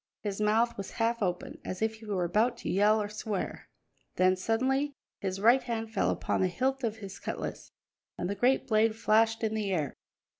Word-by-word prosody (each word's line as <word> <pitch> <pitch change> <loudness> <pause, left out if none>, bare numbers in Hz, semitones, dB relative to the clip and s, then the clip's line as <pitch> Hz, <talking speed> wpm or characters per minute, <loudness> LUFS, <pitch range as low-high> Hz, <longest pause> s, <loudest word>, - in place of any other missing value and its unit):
His 205 -1 -3
mouth 225 +3 +2
was 195 - -6
half 230 0 0
open, 180 -3 -2
as 185 - -5
if 220 0 0
he 220 - -13
were 195 -4 0
about 220 +7 +2
to - - -4
yell 210 +3 +4
or 210 - -1
swear. 210 -2 -4 0.5
Then 185 0 +4
suddenly 265 +8 0 0.2
his 190 -1 -3
right 235 +6 +5
hand 225 -2 -4
fell 200 - +2
upon - - 0
the 185 - +4
hilt 265 +9 -1
of 225 -2 -1
his 200 -3 -8
cutlass, - - -5 0.5
and 175 - -2
the 200 - -1
great 250 +7 +2
blade 220 -2 +3
flashed 225 +1 +3
in 220 -1 +1
the 210 -3 -1
air. 155 -7 -1
220 Hz, 195 wpm, -30 LUFS, 195-230 Hz, 0.5 s, right